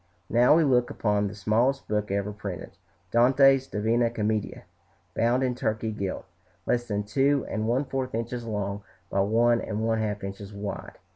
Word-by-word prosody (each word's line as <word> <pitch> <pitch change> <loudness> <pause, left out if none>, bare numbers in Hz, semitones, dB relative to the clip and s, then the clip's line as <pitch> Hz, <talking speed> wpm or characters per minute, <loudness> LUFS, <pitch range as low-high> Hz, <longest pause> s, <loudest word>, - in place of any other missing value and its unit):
Now 120 +5 +5
we 165 - +4
look 125 -4 +3
upon 105 -1 0
the 100 - -7
smallest 115 +7 +1
book 105 0 -1
ever 100 +1 -1
printed, 100 -4 -6 0.4
Dante's 135 +2 +5
"Divina 115 +2 +1
Commedia," 110 -2 -2 0.5
bound 120 +6 +2
in 125 -1 +1
Turkey 110 -2 -2
gilt, 100 -3 -4 0.4
less 120 0 0
than 105 -1 -1
two 135 +6 +1
and 110 0 -2
one 130 +5 +1
fourth 130 -3 -3
inches 120 +1 -3
long 105 -2 -3 0.3
by 100 - 0
one 115 +4 +3
and 110 +1 -3
one 115 0 +1
half 105 -2 -2
inches 100 +1 -7
wide. 100 0 -6
110 Hz, 165 wpm, -26 LUFS, 105-125 Hz, 0.5 s, Now